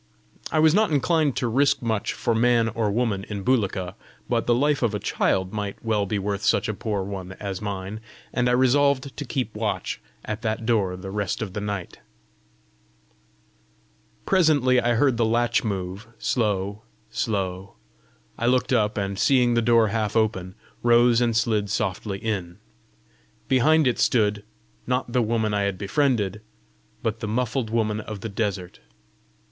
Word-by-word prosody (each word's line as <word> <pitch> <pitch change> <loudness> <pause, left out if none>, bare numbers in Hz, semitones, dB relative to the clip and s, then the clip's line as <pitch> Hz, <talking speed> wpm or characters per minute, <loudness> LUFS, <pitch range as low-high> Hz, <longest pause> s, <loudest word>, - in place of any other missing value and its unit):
I - - 0
was 155 0 +5
not 215 +1 +3
inclined 155 -1 +2
to 125 - 0
risk 135 +3 +2
much 110 -3 -1
for 115 - -1
man 115 0 +3
or 110 -1 -1
woman 105 -2 0
in 100 -2 -5
Bulika, 95 -7 0 0.3
but 120 -2 0
the 120 - +4
life 145 +3 +2
of 115 -4 +1
a - - -2
child 95 0 0
might 105 0 -5
well 105 -3 +1
be 105 - -1
worth 100 0 -2
such - - +2
a 110 - -1
poor 105 -1 -2
one 95 -1 -6
as 95 -1 -5
mine, 100 0 -4 0.3
and 125 0 +1
I - - +2
resolved 135 +1 +2
to 145 - -5
keep 125 -3 -3
watch 105 -1 -3 0.2
at 110 +1 -4
that 110 -1 -2
door 100 -6 +1
the 95 +1 -7
rest 105 +1 -2
of 95 -4 -7
the 105 - -3
night. 100 -3 -5 2.3
Presently 145 -9 +3
I 120 0 +1
heard 130 0 +3
the 115 - +2
latch 120 +1 +1
move, 95 -1 -4
slow, 100 -3 -1 0.3
slow: 95 -4 -3 0.6
I 120 - 0
looked 125 +1 +2
up, 105 -3 +1
and 100 -1 -2
seeing 125 -3 +4
the 115 - +2
door 115 -1 +4
half 110 0 -1
open, 95 -5 0 0.3
rose 120 0 +4
and 115 -2 +2
slid 110 -3 +1
softly 100 0 -2
in. 95 -5 -3 0.9
Behind 150 +5 +4
it 125 -2 +1
stood, 105 -3 +2 0.4
not 125 -1 -1
the 125 - +3
woman 110 -1 0
I 100 - +1
had 100 -2 -1
befriended, 105 -1 0 0.6
but 110 0 -1
the 110 - -4
muffled 120 +1 -1
woman 110 -2 0
of 110 -2 -7
the 110 - -4
desert. 100 -4 -3
110 Hz, 165 wpm, -24 LUFS, 100-120 Hz, 2.3 s, was